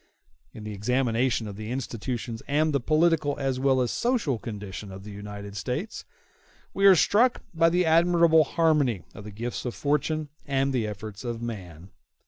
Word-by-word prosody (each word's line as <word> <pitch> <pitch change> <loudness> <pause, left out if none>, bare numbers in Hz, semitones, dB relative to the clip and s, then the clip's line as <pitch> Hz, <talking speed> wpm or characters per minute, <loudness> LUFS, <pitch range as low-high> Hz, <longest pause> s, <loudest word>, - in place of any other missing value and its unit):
In 110 - -10
the 105 0 -6
examination 120 +2 0
of 100 -1 -8
the 110 0 -6
institutions 120 -2 -4
and 150 +2 +1
the 140 - +2
political 155 +1 +2
as 135 -2 -1
well 130 -1 +3
as 125 - 0
social 230 - 0
condition 105 -2 -7
of 95 0 -9
the 105 - -9
United 100 0 -8
States, 130 - -4 0.7
we 195 0 +4
are 195 - +9
struck 235 +9 +3
by 165 0 +4
the 180 +1 +2
admirable 165 0 +5
harmony 150 - +1
of 105 - -10
the - - -7
gifts 120 +4 -5
of 125 - -4
fortune 150 +1 -1 0.2
and 135 0 +1
the 115 -4 0
efforts 105 +1 -7
of 120 -2 -4
man. 95 -7 -7
125 Hz, 170 wpm, -26 LUFS, 105-155 Hz, 0.7 s, are